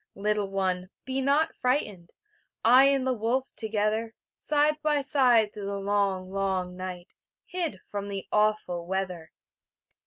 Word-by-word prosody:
Little 210 0 -1
one, 185 -2 -1 0.2
be 265 0 -2
not 285 +4 +2
frightened; 210 - -1 0.6
I 250 +4 +8
and 275 -1 +2
the 260 - +2
wolf 245 +3 -1
together, 220 +1 -1 0.2
Side 300 0 +1
be 295 -2 +2
side 245 -6 +4
through 205 -2 -6
the 200 0 -3
long, 195 -2 0
long 190 -2 -1
night, 180 -1 -7 0.4
Hid 335 - -4
from 200 -1 -4
the 195 -1 -5
awful 210 -5 +1
weather. 180 -4 -3
210 Hz, 135 wpm, -27 LUFS, 190-260 Hz, 0.6 s, I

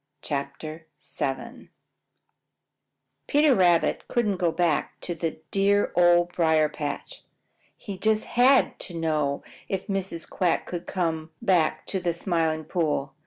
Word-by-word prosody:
QUACK 140 0 -4 0.6
RETURNS 235 - -4 1.6
Peter 295 -1 +4
Rabbit 175 -5 +3
just - - -25
couldn't 210 -5 0
go 175 -2 +1
back 165 -2 0
to 175 - -2
the 165 -1 -4
dear 200 +1 +2
Old 175 0 +4
Briar 160 -2 +3
patch. 145 -1 -6 0.5
He 195 -3 -8
just 215 +1 +2
HAD 255 +2 +4
to 175 - -7
know 155 -4 -1 0.3
if 195 -1 -2
Mrs. 190 -4 -3
Quack 175 -3 0
would 175 -1 -5
come 160 -3 -2
back 185 -8 +1
to 190 - -2
the 175 -2 -1
Smiling 165 -3 -1
Pool. 150 -5 -1
175 Hz, 130 wpm, -26 LUFS, 160-195 Hz, 1.6 s, Peter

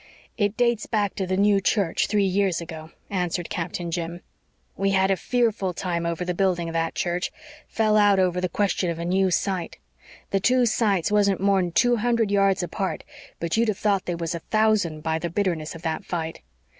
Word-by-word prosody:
"It 205 -1 0
dates 235 -3 +1
back 205 -3 0
to 190 -2 -3
the 185 0 0
new 200 0 +4
church, 195 -4 +1
three 205 -1 +2
years 190 -2 +1
ago," 160 -2 -8 0.2
answered 180 -2 -2
Captain 170 -1 -3
Jim. 170 0 -4 0.5
"We 195 +1 0
had 190 +1 +3
a - - +3
fearful 220 -5 0
time 170 -2 -2
over 170 +1 -2
the 180 - -1
building 175 -2 0
of 165 - -5
that 165 0 -1
church 175 0 -1 0.4
fell 215 -1 +1
out 205 -1 +5
over 180 -1 +1
the 185 - -1
question 195 -1 0
of 170 - -3
a 170 - -4
new 190 +2 +2
site. 185 0 -1 0.5
The 195 - +2
two 250 +4 +3
sites 205 -5 +1
wasn't 200 -2 +3
more'n 190 -2 +2
two 245 +5 +3
hundred 230 -2 +1
yards 195 -2 +3
apart, 190 +2 -3 0.4
but 170 +4 -1
you'd 230 +1 +3
have 210 -3 0
thought 205 -3 0
they 175 - -1
was 170 0 -3
a 170 - -3
thousand 215 -6 +1
by 160 +1 -1
the 170 - -3
bitterness 170 -4 -2
of 165 - -11
that 160 +3 -2
fight. 165 -3 -4
190 Hz, 200 wpm, -24 LUFS, 170-205 Hz, 0.5 s, out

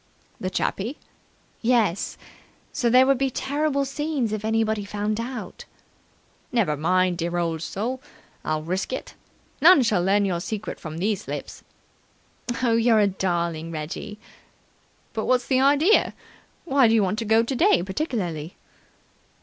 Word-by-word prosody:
"The 185 - -2
chappie?" 220 +7 -2 0.6
"Yes. 225 -6 +1 0.6
So 240 - +1
there 255 +2 +6
would 270 -1 +2
be 270 0 +1
terrible 280 +2 -1
scenes 275 -4 -2
if 215 -1 -3
anybody 220 -1 0
found 210 +2 -2
out." 245 +2 -6 0.9
"Never 210 -12 +1
mind, 180 +3 +1
dear 170 +1 -1
old 165 -2 -1
soul. 235 +9 -3 0.4
I'll 155 0 -2
risk 185 +7 -2
it. - - -5 0.5
None 325 -3 +8
shall 210 -6 +2
learn 200 +2 +3
your 180 -3 -1
secret 215 +4 -5
from 155 0 -7
these 200 +3 -1
lips." - - -6 1.0
"You're 230 -1 +4
a 210 - +5
darling, 170 -4 -1
Reggie." 165 +7 -6 1.0
"But 220 - -2
what's 250 -1 +2
the 260 -1 +2
idea? 290 +9 +4 0.5
Why 275 -6 +4
do 225 - +3
you 215 - +4
want 195 +3 -1
to 230 - -3
go 220 +1 +4
today 270 - +2
particularly?" 190 - -3
215 Hz, 140 wpm, -24 LUFS, 185-255 Hz, 1.0 s, None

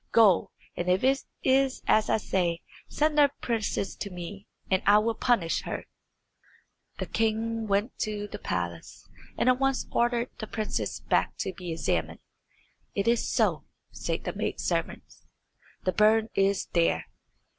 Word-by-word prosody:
Go, 210 -6 +5 0.3
and 175 +1 -2
if 185 +1 +2
it 270 +1 +3 0.2
is 265 0 +2
as 215 0 +3
I - - +4
say, 175 -5 -1 0.3
send 300 0 +1
the 285 -1 +7
princess 215 -4 -1
to 200 - -4
me, 185 +2 -8 0.2
and 190 -1 +2
I 205 +1 +8
will 225 +2 +2
punish 225 -8 +1
her." - - -4 1.1
The - - -3
king 225 0 -1
went 205 +4 +1
back - - -46
to 210 -1 -2
the 205 0 -8
palace, 85 - -4 0.3
and - - +1
at 255 0 +4
once 270 -1 +1
ordered 240 0 +1
the 220 - -5
princess's 215 -1 -3
back - - +1
to 190 - -3
be 175 -1 -6
examined. 165 - -1 0.8
"It 200 +2 0
is 235 0 +2
so," - - +1 0.3
said - - -3
the - - -3
maid - - -3
servant; - - -1 0.8
"the 185 - +3
burn 215 +3 +4
is 195 0 +2
there." 170 -1 +2
215 Hz, 155 wpm, -28 LUFS, 190-235 Hz, 1.1 s, I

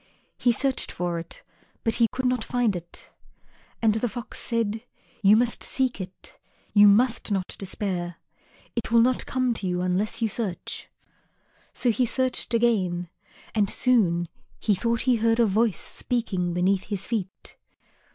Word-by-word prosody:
He 245 - +4
searched 265 +3 0
for 175 -1 -2
it, 165 - -10 0.4
but 225 - +1
he 230 - +6
could 260 0 -3
not 250 -2 +1
find 240 -5 +1
it. 175 -1 -9 0.7
And 220 0 +3
Fox 240 -2 -7
said, 225 -2 -1 0.4
"You 205 +1 +7
must 235 0 +1
seek 260 -6 -1
it; 185 0 -11 0.3
you 205 -1 +8
must 225 +2 +3
not 190 -2 0
despair; 180 -3 -3 0.6
it 235 -1 -3
will 230 0 +6
not 255 +1 +1
come 255 -2 +1
to 200 -4 -4
you 180 0 -1
unless 185 +4 0
you 230 - +2
search." 205 -4 -4 0.8
So 245 - +1
he 245 +2 +1
searched 255 -1 -1
again, 185 -7 +1 0.4
and 205 -3 +2
soon 180 -9 +2 0.3
he 210 - +2
thought 230 +3 0
he 250 -2 +3
heard 225 +1 +2
a 235 - +6
voice 215 0 +1
speaking 200 -8 -1
beneath 185 +2 +1
his 200 -2 -3
feet. 205 -5 -5
220 Hz, 150 wpm, -25 LUFS, 185-240 Hz, 0.8 s, you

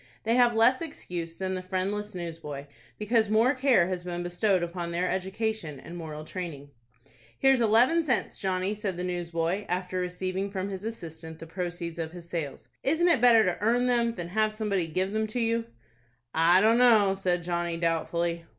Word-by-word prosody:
They 225 - +1
have 240 -1 +4
less 240 +5 +4
excuse 175 - -6
than 190 0 -2
the 185 - -3
friendless 195 +3 -3
newsboy, 160 -5 -6 0.3
because 220 0 +1
more 225 +5 +4
care 255 -9 +4
has 185 -1 -3
been 175 -1 -4
bestowed 180 +1 +1
upon 170 0 -4
their 175 +2 -1
education 190 -5 -2
and 170 - -10
moral 155 -3 -7
training. 155 -6 -7 0.7
"Here's 270 -2 +4
eleven 240 +9 +4
cents, 260 -7 -1
Johnny," 190 +1 -1
said 205 -4 -4
the 180 - -3
newsboy, 175 +1 -2
after 180 +1 -2
receiving 185 +2 -2
from 195 0 -3
his 190 0 -6
assistant 160 -7 -7
the 165 - -9
proceeds 175 0 -5
of 160 0 -4
his 175 -1 -10
sales. 160 -5 -5
"Isn't 325 +5 +2
it 315 -9 +3
better 230 -3 +6
to 180 -1 -1
earn 240 +3 +2
them 235 -2 +1
than 175 -2 -5
have 215 +3 +1
somebody 205 -5 -1
give 185 +4 -1
them 220 +1 0
to 215 +3 -3
you?" 230 0 0 0.7
"I 170 +3 +5
dunno," 225 -3 +5
said 180 -3 -1
Johnny, 170 -1 -2
doubtfully. 170 0 -1
185 Hz, 180 wpm, -28 LUFS, 170-220 Hz, 0.7 s, better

